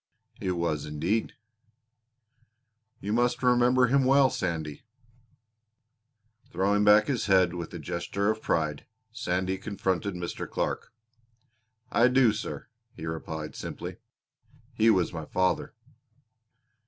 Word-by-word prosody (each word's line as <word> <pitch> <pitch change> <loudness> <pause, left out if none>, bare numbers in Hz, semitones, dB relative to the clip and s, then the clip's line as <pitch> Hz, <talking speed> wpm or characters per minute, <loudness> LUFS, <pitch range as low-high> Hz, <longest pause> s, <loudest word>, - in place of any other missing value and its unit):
"It 95 -2 -1
was 85 -4 -2
indeed." 85 +9 -1 1.7
"You 105 +2 -2
must 120 +2 +1
remember 125 +1 +4
him 135 +3 +3
well, 135 0 +5
Sandy." 80 -5 -3 1.7
Throwing 100 +3 +1
back 105 +1 +6
his 125 -6 -1
head 95 -3 +4
with 85 -2 -5
a - - -3
gesture 100 +4 -1
of 110 0 -5
pride, 75 -3 -1 0.2
Sandy 95 -3 -2
confronted 100 -1 -2
Mr. 85 -1 -5
Clark. - - -3 1.0
"I 120 - +5
do, 125 -3 +4
sir," 110 - -6 0.3
he 80 - -7
replied 80 -1 -5
simply. - - -6 0.8
"He 115 -1 +4
was 95 -6 +2
my 80 -2 -5
father." 95 +8 0
95 Hz, 115 wpm, -28 LUFS, 85-115 Hz, 1.7 s, back